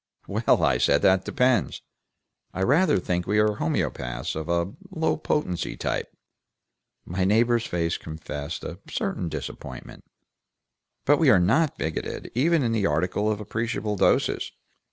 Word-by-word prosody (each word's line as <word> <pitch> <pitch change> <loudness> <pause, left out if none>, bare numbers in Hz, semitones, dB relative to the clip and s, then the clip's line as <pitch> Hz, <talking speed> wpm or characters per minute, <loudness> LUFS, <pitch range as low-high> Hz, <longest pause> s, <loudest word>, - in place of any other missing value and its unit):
"Well," - - +2
I - - +3
said, - - +3
"that 95 0 +4
depends. 125 -5 +1 0.7
I 95 - 0
rather 155 - +4
think 90 -1 -2
we 105 - +1
are 105 -1 +3
homoeopaths 65 - -2
of 80 +1 -5
a 85 +3 0 0.2
low 160 -4 0
potency 150 - -2
type." - - -2 0.9
My 90 +2 -2
neighbor's 115 +4 +3
face 85 -1 -1
confessed 75 -2 -6
a - - -6
certain 85 - -2
disappointment. - - -8 1.0
"But 145 +1 +4
we 160 -5 +5
are 105 - +6
not 130 - +2
bigoted, 80 -1 -4
even 155 +5 +2
in 115 - +1
the 105 -3 +1
article 90 +7 0
of 105 - -2
appreciable 110 0 -2
doses. - - +1
105 Hz, 140 wpm, -25 LUFS, 85-120 Hz, 1.0 s, are